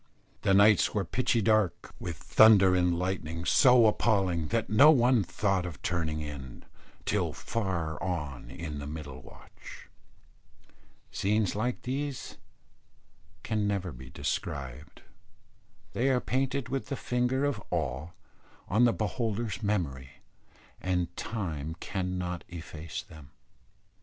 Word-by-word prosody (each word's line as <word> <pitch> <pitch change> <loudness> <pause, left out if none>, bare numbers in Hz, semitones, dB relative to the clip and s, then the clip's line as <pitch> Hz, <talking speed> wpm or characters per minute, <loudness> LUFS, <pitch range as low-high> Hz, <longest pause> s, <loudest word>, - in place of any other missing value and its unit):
The 95 - +3
nights 105 +2 +5
were 100 -2 0
pitchy 115 +3 +1
dark, 110 -4 +1
with 85 -3 -5
thunder 100 -4 +6
and 90 -1 +2
lightning 85 -2 -3
so 125 +2 +6
appalling 95 -7 +2
that 115 +3 0
no 135 +8 +7
one 125 -6 +5
thought 95 -1 0
of 85 -6 -7
turning 80 -3 -1
in, 70 -4 -8 0.4
till - - 0
far 85 -9 -3
on 75 -7 -4
in 75 -4 -6
the 70 - -6
middle 75 -4 -7
watch. - - -14 1.2
Scenes 105 -1 0
like 125 +4 -2
these 135 +1 -4 1.0
can 105 -2 0
never 95 -3 -1
be 65 0 -11
described. 70 +1 -5 0.9
They 130 +3 +1
are 130 -2 +3
painted 130 +1 -1
with 135 +1 -3
the 140 - -3
finger 125 +2 0
of 135 -8 -1
awe 65 +5 -2 0.6
on 110 +5 +4
the 120 - +4
beholder's 110 +1 -2
memory, 70 -11 -2 0.7
and 90 -1 -1
time 80 -8 -4
cannot 90 -2 -3
efface 80 -2 -7
them. 75 -3 -14
95 Hz, 120 wpm, -29 LUFS, 80-115 Hz, 1.2 s, no